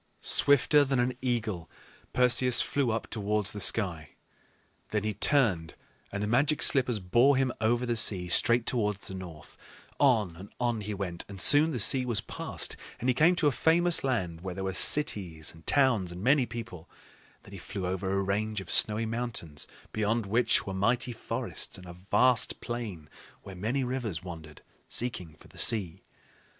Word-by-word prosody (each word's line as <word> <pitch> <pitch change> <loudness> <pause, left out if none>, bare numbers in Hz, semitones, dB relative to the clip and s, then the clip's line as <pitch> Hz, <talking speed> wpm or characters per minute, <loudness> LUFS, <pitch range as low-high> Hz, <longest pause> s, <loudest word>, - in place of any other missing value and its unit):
Swifter 145 +1 +5
than 135 -1 -1
an 125 +1 0
eagle, 110 -9 -3 0.4
Perseus 125 0 +4
flew 140 -4 0
up 110 0 -2
towards 105 -2 -2
the 105 - -7
sky. 90 -7 +2 0.7
Then 105 -1 -2
he 110 0 -2
turned, 100 - +1 0.4
and 100 +1 -4
the - - -2
Magic 140 +7 +1
Slippers 125 -4 +3
bore 120 +9 +2
him 130 -1 0
over 120 +3 +1
the 120 -1 -1
sea 95 -5 +3
straight 115 +6 +2
towards 105 -5 -2
the - - -7
north. 85 -5 -10 0.4
On 110 - +2
and 95 +3 -11
on 120 -3 -1
he 105 0 -5
went, 90 -3 -5
and 100 -1 -10
soon 145 - +6
the 145 - -4
sea 125 +4 +5
was 120 -4 -2
passed; - - -5 0.2
and 125 - -2
he - - -1
came 160 +7 +3
to 175 - -1
a 145 - +4
famous 170 +5 +1
land, 90 -11 -2
where 90 -1 -6
there 95 - -5
were 95 0 -3
cities 95 - +1
and 80 0 -19
towns 125 -11 +2
and 90 +2 -8
many 135 0 +2
people. 115 -8 -9
And - - -27
then 100 - -15
he 100 - -9
flew 95 +1 -6
over 95 +1 -3
a 100 0 0
range 105 +2 -2
of 95 -3 -9
snowy 110 +1 +2
mountains, 110 -10 -5 0.3
beyond 110 +1 -1
which 115 +5 +1
were 95 - -5
mighty 120 +6 0
forests 115 0 -4
and 90 - -13
a 90 - -10
vast 105 +7 +1
plain 110 -10 -6 0.4
where 95 - -10
many 115 +9 -2
rivers 120 -9 -4
wandered, 80 -4 -11 0.3
seeking 90 -10 -3
for - - -19
the - - -12
sea. 95 -6 +2
110 Hz, 180 wpm, -28 LUFS, 95-125 Hz, 0.7 s, soon